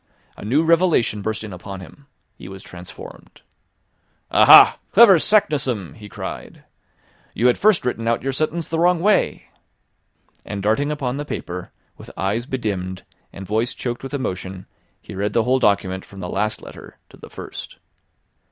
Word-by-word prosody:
A -, -, -11 dB
new 135 Hz, +10 st, +1 dB
revelation 165 Hz, -, +2 dB
burst 110 Hz, +2 st, -3 dB
in 105 Hz, -3 st, -8 dB
upon 95 Hz, +2 st, -8 dB
him. 140 Hz, +10 st, -14 dB, 0.3 s
He -, -, -12 dB
was 95 Hz, -1 st, -10 dB
transformed! 90 Hz, +2 st, -12 dB, 0.9 s
"Aha, -, -, +8 dB
clever 200 Hz, -5 st, +8 dB
Saknussemm!" 135 Hz, -, +1 dB
he 105 Hz, -2 st, -12 dB
cried. -, -, -8 dB, 0.7 s
"You 115 Hz, -, -1 dB
had 125 Hz, -, +3 dB
first 205 Hz, -9 st, +3 dB
written 115 Hz, -2 st, -2 dB
out 115 Hz, 0 st, 0 dB
your 135 Hz, -, -1 dB
sentence 155 Hz, +4 st, -2 dB
the 165 Hz, -, -2 dB
wrong 175 Hz, 0 st, +3 dB
way." 205 Hz, +4 st, +1 dB, 0.9 s
And 100 Hz, -1 st, -6 dB
darting 125 Hz, +8 st, +1 dB
upon 135 Hz, -3 st, -3 dB
the 145 Hz, -, -3 dB
paper, 90 Hz, -10 st, -6 dB, 0.3 s
with -, -, -12 dB
eyes 105 Hz, +6 st, -2 dB
bedimmed, 95 Hz, -8 st, -4 dB, 0.3 s
and 95 Hz, +2 st, -9 dB
voice 110 Hz, +4 st, -1 dB
choked 120 Hz, -1 st, -4 dB
with 135 Hz, +2 st, -6 dB
emotion, 95 Hz, -7 st, -5 dB, 0.3 s
he -, -, -12 dB
read 100 Hz, +2 st, -2 dB
the 115 Hz, -, +2 dB
whole 130 Hz, +2 st, +2 dB
document 95 Hz, -4 st, +1 dB
from 100 Hz, -, -14 dB
the 90 Hz, -, -6 dB
last 105 Hz, +3 st, -2 dB
letter -, -, -12 dB
to -, -, -17 dB
the -, -, -13 dB
first. -, -, -9 dB
115 Hz, 160 wpm, -21 LUFS, 95-145 Hz, 0.9 s, Aha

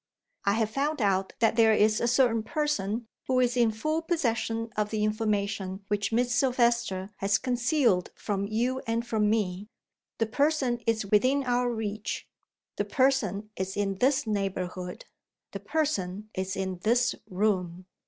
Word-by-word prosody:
"I 200 Hz, -, +3 dB
have 220 Hz, 0 st, 0 dB
found 290 Hz, +4 st, -1 dB
out 195 Hz, -3 st, +1 dB
that 225 Hz, -1 st, +3 dB
there 220 Hz, -1 st, +6 dB
is 215 Hz, +1 st, +3 dB
a 235 Hz, -, +2 dB
certain 240 Hz, -2 st, +3 dB
person 230 Hz, -4 st, -2 dB, 0.2 s
who 255 Hz, -1 st, +2 dB
is 245 Hz, -1 st, +2 dB
in 240 Hz, -2 st, +4 dB
full 310 Hz, +9 st, -1 dB
possession 230 Hz, -9 st, -1 dB
of 210 Hz, 0 st, 0 dB
the 215 Hz, -1 st, -1 dB
information 205 Hz, -2 st, -1 dB
which 205 Hz, 0 st, 0 dB
Miss 245 Hz, +2 st, +1 dB
Silvester 235 Hz, -6 st, +1 dB
has 195 Hz, 0 st, +2 dB
concealed 245 Hz, -, +1 dB
from 200 Hz, -1 st, -2 dB
you 245 Hz, +5 st, 0 dB
and 230 Hz, +1 st, 0 dB
from 215 Hz, -3 st, +1 dB
me. 205 Hz, -2 st, -1 dB, 0.5 s
The 225 Hz, -, +1 dB
person 265 Hz, 0 st, +1 dB
is 220 Hz, -2 st, +1 dB
within 255 Hz, +8 st, +3 dB
our 245 Hz, -1 st, +1 dB
reach. 215 Hz, -2 st, -4 dB, 0.5 s
The -, -, 0 dB
person 215 Hz, -7 st, +1 dB
is 190 Hz, +1 st, -4 dB
in 195 Hz, -2 st, -1 dB
this 265 Hz, +2 st, +2 dB
neighborhood. 185 Hz, -3 st, -3 dB, 0.5 s
The 200 Hz, -, -5 dB
person 210 Hz, -, -2 dB
is 190 Hz, 0 st, -3 dB
in 190 Hz, -2 st, -3 dB
this 240 Hz, +5 st, +2 dB, 0.2 s
room!" 185 Hz, -2 st, -1 dB
220 Hz, 155 wpm, -28 LUFS, 200-245 Hz, 0.5 s, there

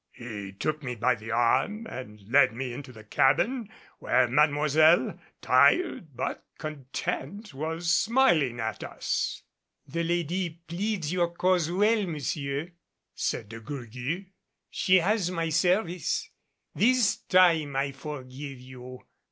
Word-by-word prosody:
He 105 Hz, -5 st, -7 dB
took 155 Hz, +9 st, -2 dB
me 125 Hz, -3 st, -4 dB
by 120 Hz, +3 st, +2 dB
the 110 Hz, -1 st, -9 dB
arm 120 Hz, -, +1 dB
and 105 Hz, -, -9 dB
led 130 Hz, 0 st, +5 dB
me 125 Hz, 0 st, -4 dB
into 130 Hz, +1 st, -8 dB
the 110 Hz, -3 st, -13 dB
cabin, 195 Hz, -, +2 dB, 0.3 s
where -, -, +3 dB
Mademoiselle, 150 Hz, +4 st, +3 dB, 0.2 s
tired 240 Hz, -, +3 dB
but -, -, -3 dB
content, 155 Hz, -, -5 dB
was 165 Hz, +4 st, -2 dB
smiling 175 Hz, -, +3 dB
at 110 Hz, 0 st, -3 dB
us. -, -, -3 dB, 0.4 s
"The 165 Hz, +5 st, -2 dB
lady 170 Hz, 0 st, -1 dB
pleads 180 Hz, -2 st, -2 dB
your 175 Hz, -2 st, +1 dB
cause 175 Hz, -1 st, +1 dB
well, 205 Hz, +3 st, +2 dB
monsieur," 145 Hz, 0 st, -3 dB, 0.4 s
said 105 Hz, -, -3 dB
De 115 Hz, 0 st, -8 dB
Gourgues. 130 Hz, -, -5 dB, 0.5 s
"She 185 Hz, -, +3 dB
has 190 Hz, +1 st, +1 dB
my 165 Hz, -2 st, -2 dB
service. 175 Hz, +1 st, 0 dB, 0.4 s
This 240 Hz, +1 st, +3 dB
time 165 Hz, -6 st, +3 dB
I 140 Hz, +1 st, 0 dB
forgive 135 Hz, -1 st, -8 dB
you. 125 Hz, 0 st, -11 dB
155 Hz, 125 wpm, -27 LUFS, 130-180 Hz, 0.5 s, led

